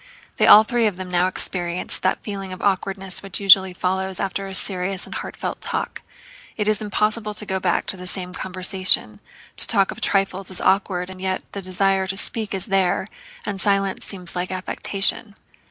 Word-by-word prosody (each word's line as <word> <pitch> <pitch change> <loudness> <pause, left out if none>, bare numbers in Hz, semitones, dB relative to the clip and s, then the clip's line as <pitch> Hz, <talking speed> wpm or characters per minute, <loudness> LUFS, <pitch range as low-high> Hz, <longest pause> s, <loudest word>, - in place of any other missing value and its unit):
They - - +3
all 215 - +9
three 235 0 0
of 205 - -3
them 185 0 -8
now 180 +1 +2
experienced 180 -1 +3
that 185 - -1
feeling 195 -2 -6
of 185 - -8
awkwardness 195 -1 -1
which 195 -1 -5
usually 190 -1 +6
follows 190 +1 -2
after 195 0 -3
a 190 - -4
serious 185 0 +1
and - - -10
heartfelt - - -6
talk. - - -4 0.6
It 210 -2 -2
is 215 0 +1
impossible 210 0 -1
to 210 - -3
go 190 -1 -2
back 180 -2 -1
to 190 - -4
the 180 0 -9
same 180 -1 -4
conversation, 185 - +1 0.4
to - - +5
talk 195 -1 +3
of - - -11
trifles 195 -1 0
is 185 - -3
awkward, 190 -2 0
and 185 0 -11
yet 190 0 -2
the 200 - -6
desire 190 +1 0
to 190 +1 -3
speak 215 0 +3
is 190 0 +2
there 190 -2 0 0.4
and 195 -2 -4
silence 195 -1 0
seems 180 -3 -7
like 180 +1 -3
affectation. 195 +3 -1
190 Hz, 185 wpm, -21 LUFS, 185-200 Hz, 0.6 s, all